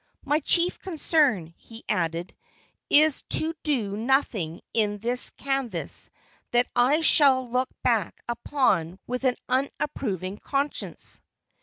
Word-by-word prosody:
"My 295 +1 +2
chief 345 +4 +2
concern," 290 - +1
he 225 0 -13
added, 170 +1 -1 0.6
"is 305 -1 +5 0.2
to 320 +1 -1
do 235 -10 -1
nothing 220 - 0
in 210 -2 +1
this 240 +4 0
canvass 270 -3 -3 0.4
that 240 +1 +3
I 260 +6 +4
shall 270 -5 +5
look 250 +2 0
back 225 -7 +1
upon 220 - 0
with 250 +2 -3
an 250 -1 +3
unapproving 250 - -2
conscience." 280 +1 -3
250 Hz, 115 wpm, -26 LUFS, 205-280 Hz, 0.6 s, is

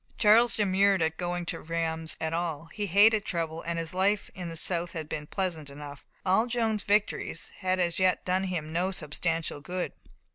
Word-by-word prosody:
Charles 230 +3 +5
demurred 195 -2 +3
at 160 0 -1
going 175 0 -2
to - - -4
Reims 165 0 -1
at 160 0 -2
all. 165 -2 -3
He 210 -1 -3
hated 205 +3 +5
trouble, 165 -2 -3
and 170 0 -2
his 165 0 -4
life 195 +2 +1
in 180 -2 -6
the 165 - -6
south 170 0 0
had 160 -3 -4
been 150 -1 -5
pleasant 170 -7 -2
enough. 145 0 -10 0.2
All 195 +5 +3
Joan's 225 -3 0
victories 205 +1 0
had 185 -1 0
as 175 -1 0
yet 185 -1 +2
done 185 +1 +1
him 160 -4 -3
no 180 +3 +1
substantial 165 -2 -2
good. 180 +4 -3
175 Hz, 185 wpm, -28 LUFS, 165-195 Hz, 0.2 s, Charles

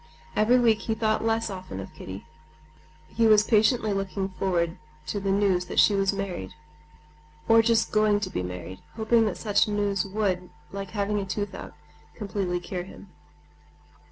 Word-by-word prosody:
Every 225 +4 +4
week 230 -3 +3
he 220 - -2
thought 220 -1 0
less 225 -1 0
often 185 - -7
of 95 - -8
Kitty. 95 +1 -9 0.8
He 230 0 +2
was 215 -1 +6
impatiently 220 -1 +3
looking 195 0 -2
forward 180 -3 -1 0.3
to 155 +7 -3
the 195 0 -2
news 195 -2 +2
that - - -7
she 210 - +6
was 195 -1 +2
married, 195 - -5 0.9
or 225 0 +7
just 225 0 +2
going 215 -1 +3
to 185 -3 -3
be - - -2
married, 90 +1 -7 0.2
hoping 225 +1 +3
that 205 - -3
such 210 -1 +2
news 205 -2 0
would, 190 -3 -2 0.2
like 195 -1 -6
having 205 +1 0
a 195 - -3
tooth 205 +1 -3
out, - - -8 0.4
completely 195 -4 -2
cure 180 +1 -5
him. 190 +2 -12
200 Hz, 165 wpm, -26 LUFS, 185-215 Hz, 0.9 s, or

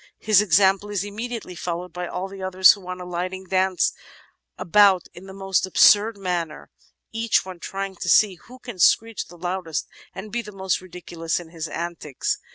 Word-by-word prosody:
His 210 -1 +4
example 195 +1 +3
is 200 -2 -2
immediately 220 0 -6
followed 175 0 -5
by 180 0 -4
all 180 +2 -4
the 195 0 -10
others, 185 0 +6
who, 195 -3 -6
on 185 0 -5
alighting, 180 +1 -4
dance 185 -1 +1 0.6
about 195 -1 +4
in 185 +2 -12
the - - -9
most 195 0 -1
absurd 205 +3 +5
manner, 175 -5 -4 0.4
each 225 -3 +1
one 185 -2 -9
trying 195 +1 -5
to - - -4
see 210 -3 +5
who 250 +1 -12
can 240 -7 -10
screech 225 +5 +3
the 175 - -14
loudest 175 -2 -3 0.3
and 205 +2 -8
be 240 +2 -1
the 210 -2 -10
most 190 -2 -2
ridiculous 170 -2 -4
in 170 -2 -11
his 165 -1 -6
antics. 165 -5 -4
190 Hz, 175 wpm, -23 LUFS, 175-205 Hz, 0.6 s, others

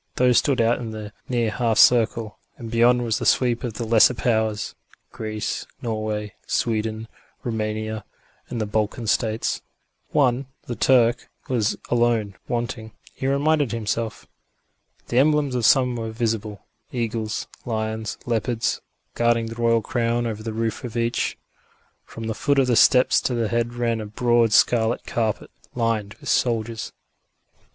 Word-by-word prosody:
Those 125 -2 +4
stood 135 -3 0
out 115 +1 +3
in 115 -2 -5
the 110 -1 -7 0.2
near 120 -3 +1
half 115 -1 0
circle, 115 -2 +4 0.2
and 115 -2 -8
beyond 120 +1 +4
was 115 -2 0
the - - -3
sweep 120 -2 +2
of 120 -3 -3
the 115 - -3
lesser 115 +2 +5
powers: 110 -3 0 0.4
Greece, 110 -1 -4
Norway, 110 -2 -3
Sweden, 110 -1 -1 0.4
Roumania 110 -1 -3 0.5
and 120 - -4
the 110 - 0
Balkan 110 +3 -1
States. 110 +1 0 0.5
One, 130 -2 +2 0.2
the 120 - -4
Turk, 120 -1 +3 0.2
was 115 -4 0
alone 115 -4 +2
wanting, 115 -2 -3 0.2
he 135 - -3
reminded 145 -2 +2
himself. 115 0 -3 0.8
The 120 - +3
emblems 150 -1 +3
of 120 -3 0
some 125 -3 +4
were 115 -1 -4
visible 110 -2 -3 0.3
eagles, 115 -3 -2 0.2
lions, 110 -1 -3
leopards 115 0 -1 0.3
guarding 120 -1 +2
the 115 - -7
royal 115 -1 +3
crown 120 0 0
above 110 -1 -4
the 115 - -2
roof 115 0 -2
of 120 -2 -5
each. 115 +1 0 0.7
From 115 - -9
the 110 0 -2
foot 140 +5 0
of 135 - +5
the 125 -2 +2
steps 125 +3 +5
to 125 - -1
the 115 -2 0
head 120 0 -1
ran 115 -2 0
a 105 - -6
broad 120 +1 +2
scarlet 115 +1 +3
carpet, 110 -3 -2 0.2
lined 115 -4 -1
with - - -13
soldiers. 115 -2 0
115 Hz, 150 wpm, -23 LUFS, 110-120 Hz, 0.8 s, lesser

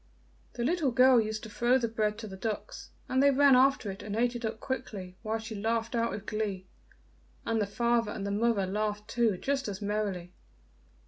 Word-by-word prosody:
The 240 - -3
little 315 +1 +1
girl 250 0 +6
used 215 0 -4
to 220 - -7
throw 240 +4 +3
the 240 -3 0
bread 215 -2 -1
to 225 -1 -7
the 190 - -8
ducks, 210 +2 -5 0.2
and 260 +1 +2
they 280 - +6
ran 280 -1 +6
after 260 -5 +3
it 195 - -9
and 205 0 -5
ate 240 +2 +1
it 240 - -5
up 220 0 -3
quickly, 210 -9 -5
while 220 0 -1
she 220 0 -7
laughed 225 +2 -1
out 235 -1 +1
with 205 0 -6
glee, 205 -3 -3 0.8
and 225 -1 0
the 205 - 0
father 235 +1 +1
and 200 - -5
the 200 - -2
mother 210 -1 +1
laughed 210 +2 -2
too 230 -4 +1
just 270 +4 -1
as 200 -2 -4
merrily. 200 -4 -2
220 Hz, 205 wpm, -30 LUFS, 205-240 Hz, 0.8 s, girl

